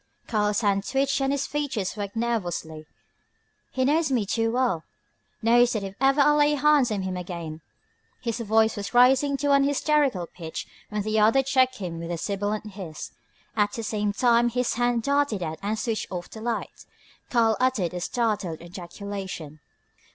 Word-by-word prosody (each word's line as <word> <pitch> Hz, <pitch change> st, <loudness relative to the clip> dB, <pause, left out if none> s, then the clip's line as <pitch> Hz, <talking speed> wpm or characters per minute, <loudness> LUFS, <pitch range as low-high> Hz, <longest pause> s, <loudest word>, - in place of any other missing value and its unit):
Karl's 210 Hz, -1 st, +1 dB
hands 200 Hz, -2 st, +1 dB
twitched 275 Hz, 0 st, +1 dB
and 270 Hz, 0 st, +1 dB
his 280 Hz, -1 st, 0 dB
features 265 Hz, -11 st, -2 dB
worked 205 Hz, -1 st, -5 dB
nervously. 175 Hz, -9 st, -2 dB, 0.8 s
"He 260 Hz, 0 st, 0 dB
knows 305 Hz, +1 st, +2 dB
me 235 Hz, -6 st, +1 dB
too 225 Hz, +3 st, 0 dB
well, 240 Hz, -10 st, +1 dB, 0.6 s
knows 240 Hz, +2 st, +5 dB
that 215 Hz, -3 st, -2 dB
if 195 Hz, -1 st, -5 dB
ever 270 Hz, +2 st, +4 dB
I 285 Hz, +1 st, +6 dB
lay 295 Hz, 0 st, +4 dB
hands 290 Hz, -3 st, +4 dB
on 205 Hz, -3 st, -2 dB
him 185 Hz, -1 st, -3 dB
again 170 Hz, -3 st, -6 dB, 0.3 s
" -, -, -42 dB
His 230 Hz, -1 st, -2 dB
voice 220 Hz, 0 st, +2 dB
was 205 Hz, +3 st, -6 dB
rising 265 Hz, +3 st, +5 dB
to 285 Hz, +1 st, 0 dB
an 280 Hz, 0 st, +5 dB
hysterical 285 Hz, -, +1 dB
pitch 165 Hz, -1 st, -7 dB, 0.2 s
when 210 Hz, -1 st, -2 dB
the 215 Hz, +1 st, +1 dB
other 225 Hz, +6 st, +4 dB
checked 260 Hz, -1 st, +2 dB
him 175 Hz, -5 st, -5 dB
with 165 Hz, 0 st, -6 dB
a 170 Hz, -, -2 dB
sibilant 205 Hz, +3 st, -3 dB
hiss. 180 Hz, -6 st, -7 dB, 0.4 s
At 205 Hz, -1 st, +1 dB
the 230 Hz, -, -4 dB
same 210 Hz, -1 st, -1 dB
time 240 Hz, +2 st, +3 dB
his 250 Hz, +1 st, 0 dB
hand 240 Hz, -1 st, +1 dB
darted 280 Hz, -8 st, +1 dB
out 160 Hz, -1 st, -4 dB
and 210 Hz, +2 st, -1 dB
switched 220 Hz, 0 st, -2 dB
off 175 Hz, -1 st, -5 dB
the 220 Hz, -, -9 dB
light. 235 Hz, 0 st, -4 dB, 0.4 s
Karl 230 Hz, -3 st, +3 dB
uttered 250 Hz, -9 st, +1 dB
a 180 Hz, -, -4 dB
startled 210 Hz, -7 st, -1 dB
ejaculation. 175 Hz, -2 st, -7 dB
220 Hz, 175 wpm, -25 LUFS, 195-255 Hz, 0.8 s, I